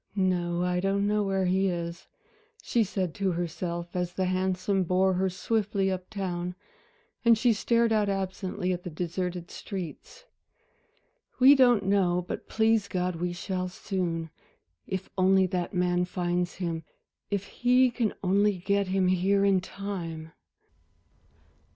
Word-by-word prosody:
"No, 175 -3 +1
I 180 0 0
don't 195 +2 +1
know 210 +1 +2
where 195 -1 0
he 190 +2 +2
is," 170 -1 -4 0.6
she 235 - +2
said 190 -4 -2
to 195 -1 0
herself, 170 0 -4
as 180 -1 -1
the 190 - -1
hansom 185 +1 0
bore 185 +2 +2
her 190 +1 +1
swiftly 200 0 0
up 185 -1 -5
town, 180 -3 -3 0.7
and 230 -1 +6
she 235 +1 +3
stared 230 +1 +2
out 210 -2 +2
absently 190 -1 -2
at 180 - -4
the 180 - -6
deserted 175 +1 -4
streets. 195 - -7 1.1
"We 265 +2 +8
don't 245 -7 +4
know, 180 -3 +2
but - - -5
please 220 -2 +2
God, 180 -2 -2
we 175 +1 -2
shall 185 +1 -3
soon. 175 -4 -3 0.6
If 190 -1 -4
only 190 0 +5
that 180 -1 -2
man 180 -1 +1
finds 175 0 -2
him, 165 -3 -3 0.5
if 200 -1 -1
he 250 +1 +3
can 230 -3 -1
only 200 +1 +3
get 200 +2 0
him 190 0 +1
here 190 +2 +2
in 195 -1 +4
time." 170 -5 -6
185 Hz, 145 wpm, -28 LUFS, 180-200 Hz, 1.1 s, We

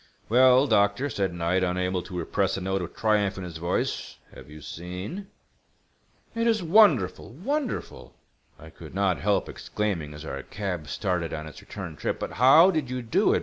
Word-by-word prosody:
"Well, 130 +3 +6
doctor," 110 +3 +2
said 95 -2 -1
Knight, 85 +2 0
unable 90 0 0
to 90 0 -8
repress 95 +2 0
a - - -5
note 95 +1 -1
of 85 - -7
triumph 105 -3 +1
in 95 - -5
his 85 -2 -7
voice, 85 +2 -2 0.2
"have 65 - -13
you 75 +1 -11
seen?" 90 - -7 1.1
"It 230 0 0
is 220 -4 +2
wonderful—wonderful!" 185 - +1 0.4
I 80 +1 -13
could 80 +1 -12
not 95 -5 +1
help 100 +4 +1
exclaiming 90 -9 -3
as 75 +1 -9
our 70 -3 -5
cab 90 -3 -5
started 90 -1 -2
on 75 0 -6
its 80 - -11
return - - -8
trip. - - -2
"But - - -4
how 155 - +6
did 155 -7 -2
you 125 -1 -4
do 110 - +2
it? - - +2
95 Hz, 175 wpm, -26 LUFS, 85-125 Hz, 1.1 s, Well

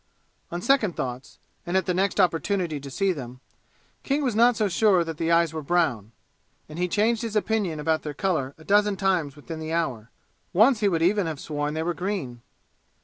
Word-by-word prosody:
On 175 +1 -4
second 230 -8 +2
thoughts, 125 +1 -5 0.3
and 175 +2 0
at 190 - +1
the 180 - 0
next 190 +2 0
opportunity 175 -2 +1
to 140 0 -9
see 195 +7 0
them, 130 -6 -7 0.6
King 285 +2 -1
was 250 -5 0
not 240 +2 +5
so 215 - +2
sure 190 -1 +3
that 165 -2 -6
the 165 +1 0
eyes 165 -1 +3
were 160 - -4
brown, 140 - 0 0.6
and 155 +2 -9
he 180 - +1
changed 215 +4 +1
his 225 -2 -4
opinion 205 -7 0
about 160 +1 0
their 150 -2 -6
color 145 -8 -1
a 160 - -15
dozen 205 +2 +2
times 185 -8 0
within 160 +2 -8
the 160 0 -4
hour. 130 -9 -2 0.4
Once 220 +6 +5
he 205 -2 +2
would 165 -3 0
even 195 +1 +2
have 155 -3 -4
sworn 150 0 -3
they 160 - -1
were 175 +1 -1
green. 175 - -4
175 Hz, 205 wpm, -25 LUFS, 155-200 Hz, 0.6 s, not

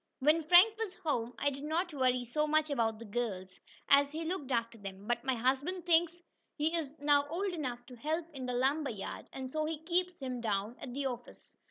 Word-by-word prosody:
When 305 +4 +4
Frank 360 +7 +7
was 420 -5 -3
home 245 -6 -1
I 285 - +1
did 275 0 -7
not 325 +4 -1
worry 255 -3 +2
so 300 +6 0
much 310 0 +2
about 225 -5 +1
the 230 - -9
girls, 200 -5 -4 0.3
as 280 0 +5
he 325 +1 -3
looked 320 -5 -3
after 230 -1 -1
them. 195 0 -8
But 240 +1 -1
my 260 -1 +1
husband 275 +9 0
thinks 345 0 +3 0.4
he 315 +3 0
is 310 -5 -2
now 285 -1 +3
old 370 +4 -1
enough 250 -7 -4
to 250 - -11
help 310 +7 -2
in 260 -3 -5
the 250 - -2
lumber 275 +4 +1
yard, 205 -4 -6
and 265 -1 -5
so 310 +4 -1
he 315 0 -2
keeps 360 +1 0
him 255 -3 -4
down 210 0 -1
at 255 - -7
the 280 0 -2
office. 245 -2 -6
280 Hz, 215 wpm, -33 LUFS, 245-320 Hz, 0.4 s, Frank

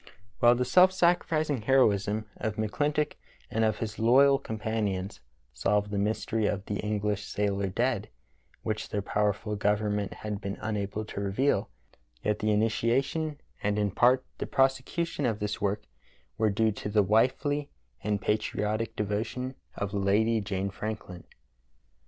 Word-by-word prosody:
" 100 -3 -34
While 120 0 +6
the 125 +1 0
self 180 +9 +6
sacrificing 165 - +2
heroism 110 -4 +3
of 110 -1 -2
McClintock 145 +8 0 0.4
and 110 - +1
of 110 -1 +2
his 105 -2 -5
loyal 135 +4 +5
companions 105 -5 -3 0.3
solved 105 +10 +1
the 100 - 0
mystery 110 +1 0
of 100 0 -2
the 100 - -3
English 105 -1 -1
sailor 100 -1 0
dead, 110 +2 -1 0.5
which 110 -1 -3
their 100 -1 -2
pow^erful 105 +1 -1
government 105 -1 0
had 105 -1 -5
been 100 -1 -4
unable 105 -1 -3
to 100 - -5
reveal, 100 +8 +1 0.5
yet 105 0 0
the 110 - 0
initiation 130 +8 +1 0.2
and 105 0 0
in 105 -1 +1
part 125 +5 +4
the - - -3
prosecution 135 +3 +1
of 110 -3 0
this 105 0 -3
work 100 +1 0 0.5
were 110 -1 +2
due 110 +2 +2
to 105 - -5
the 105 0 +4
wifely 130 +8 +2 0.3
and 105 -1 0
patriotic 110 +1 -1
devotion 110 +5 -2 0.2
of 100 0 -3
Lady 105 +3 +2
Jane 100 -1 -2
Franklin. 105 -4 -6
105 Hz, 145 wpm, -29 LUFS, 105-125 Hz, 0.5 s, While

